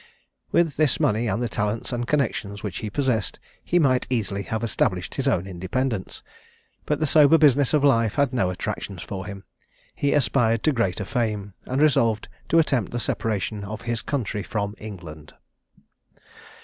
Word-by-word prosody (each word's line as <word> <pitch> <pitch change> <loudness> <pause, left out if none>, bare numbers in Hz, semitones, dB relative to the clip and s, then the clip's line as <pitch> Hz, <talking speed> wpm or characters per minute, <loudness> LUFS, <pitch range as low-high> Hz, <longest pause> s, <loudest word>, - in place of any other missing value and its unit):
With 165 -5 +2
this 155 -5 +3
money, 110 +3 +1
and 110 +4 -1
the - - 0
talents 105 +4 -2
and 120 0 -2
connexions 110 -8 -1
which 100 -5 -4
he 110 - -4
possessed, 110 - -1 0.2
he 175 - +1
might 130 -6 +3
easily 105 -5 -1
have 110 +2 -3
established 95 -5 0
his 135 0 -2
own 95 -9 +1
independence; 95 +4 -3 0.6
but 150 - 0
the 155 - +1
sober 155 +1 +6
business 145 -3 +4
of 150 -2 +2
life 115 -5 +3
had 140 -3 +2
no 115 -8 +1
attractions 90 0 -4
for 95 -1 -6
him; 100 -1 -8 0.5
he 145 - 0
aspired 115 -4 +2
to 155 - +4
greater 100 -6 -1
fame, 105 -3 -2
and 135 +4 +1
resolved 115 -7 +2 0.2
to 165 - +4
attempt 135 - +2
the 120 - -2
separation 105 -2 -2
of 105 +2 -6
his 120 -1 -2
country 115 -7 -2
from 100 -1 -3
England. 85 -8 -10
115 Hz, 165 wpm, -24 LUFS, 100-135 Hz, 0.6 s, sober